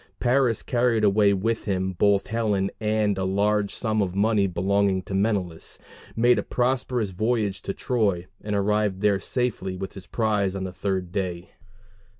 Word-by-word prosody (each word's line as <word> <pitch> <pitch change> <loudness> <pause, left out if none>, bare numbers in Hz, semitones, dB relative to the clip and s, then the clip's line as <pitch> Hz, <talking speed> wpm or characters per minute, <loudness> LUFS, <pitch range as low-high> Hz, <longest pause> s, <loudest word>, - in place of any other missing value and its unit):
Paris 125 -2 +2
carried 120 -3 +1
away 100 0 +4
with 110 +4 -1
him 95 -2 -1
both 100 +2 +2
Helen 105 -4 0
and 105 -2 +1
a - - -1
large 100 +2 +1
sum 110 -2 0
of 95 -2 -2
money 105 0 +2
belonging 95 +1 +1
to 95 - -7
Menelaus, 95 -5 -1 0.4
made 120 0 +4
a - - +1
prosperous 125 -3 -1
voyage 105 0 -1
to 100 - -4
Troy, 105 -9 0 0.2
and 105 0 -2
arrived 100 -1 +1
there 105 -2 +3
safely 105 -5 -2
with 95 +1 -6
his 95 - -11
prize 105 -4 0
on 95 - -3
the 95 -1 -5
third 95 -2 -2
day. 90 -2 -3
100 Hz, 160 wpm, -25 LUFS, 95-110 Hz, 0.4 s, away